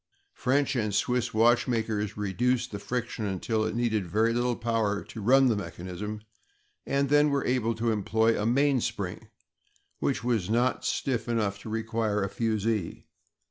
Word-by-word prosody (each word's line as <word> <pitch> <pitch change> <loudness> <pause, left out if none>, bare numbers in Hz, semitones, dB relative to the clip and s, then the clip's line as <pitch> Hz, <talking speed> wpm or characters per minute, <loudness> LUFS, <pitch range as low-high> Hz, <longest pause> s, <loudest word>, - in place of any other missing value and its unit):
French 135 +1 +1
and 105 -4 0
Swiss 120 +2 0
watchmakers 110 -2 +1
reduced 115 +5 0
the 100 - -5
friction 120 0 -3
until 105 +3 -1
it 110 - -2
needed 110 -5 0
very 110 +6 +2
little 120 0 +1
power 110 -3 -1
to 110 - -9
run 135 +6 +5
the 120 -4 +3
mechanism, 100 +2 -6 0.7
and 140 0 +1
then 145 +1 +5
were 140 -1 0
able 115 -3 +1
to 115 +1 0
employ 110 +2 +2
a - - -1
mainspring 135 +2 0 0.7
which - - -1
was 115 -6 0
not 120 +3 +1
stiff 120 -4 -1
enough 105 -4 0
to 110 - -9
require 110 -2 -1
a 100 - -2
fusee. 110 -4 -1
115 Hz, 150 wpm, -28 LUFS, 105-125 Hz, 0.7 s, run